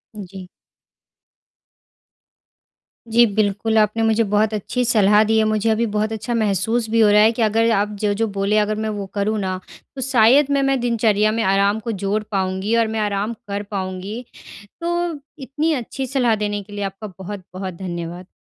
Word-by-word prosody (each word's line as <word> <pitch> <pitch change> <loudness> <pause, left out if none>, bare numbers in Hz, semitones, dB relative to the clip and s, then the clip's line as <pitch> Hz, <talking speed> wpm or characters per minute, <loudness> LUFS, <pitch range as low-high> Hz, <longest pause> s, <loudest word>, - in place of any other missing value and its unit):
उ, 210 - -6
जी। 190 -2 -9 2.6
जी, 235 +1 +5
बिल्कुल। 215 +1 0
आपने 215 +1 +2
मुझे 225 0 +3
बहुत 210 +1 +2
अच्छी 215 +4 -2
सलाह 210 -2 +4
दी 220 +1 +1
है। 220 - +4
मुझे 215 +1 +1
अभी 220 +1 +2
बहुत 215 +1 0
अच्छा 220 +2 -4
महसूस 220 +2 0
भी 230 +1 +1
हो 215 - +6
रहा 210 0 +6
है 220 +1 +5
कि 235 - -4
अगर 225 +1 +2
आप 205 -1 +1
जो-जो 210 +1 0
बोले 200 +2 +1
अगर 215 +1 -2
मैं - - -1
वो 200 - -4
करूँ 210 +2 0
ना 185 -2 -2 0.4
तो 265 - -5
शायद 260 +3 +5
मे 280 0 +2
मैं 270 -1 +1
दिनचर्या 220 -3 +2
में - - +1
आराम 200 +2 +2
को - - 0
जोड़ 205 +2 0
पाऊँगी 190 +2 -1
और 230 -1 +3
मैं 220 0 -3
आराम 205 +1 -1
कर 200 0 -3
पाऊँगी। 190 +4 -4 0.6
तो 340 +1 -1 0.5
इतनी 295 +5 -1
अच्छी 265 +1 -4
सलाह 250 -3 +1
देने 205 0 -2
के 205 +1 -16
लिए 205 0 -4
आपका 195 +1 -6
बहुत-बहुत 190 -1 -7
धन्यवाद। 175 0 -6
215 Hz, 180 wpm, -20 LUFS, 200-225 Hz, 2.6 s, हो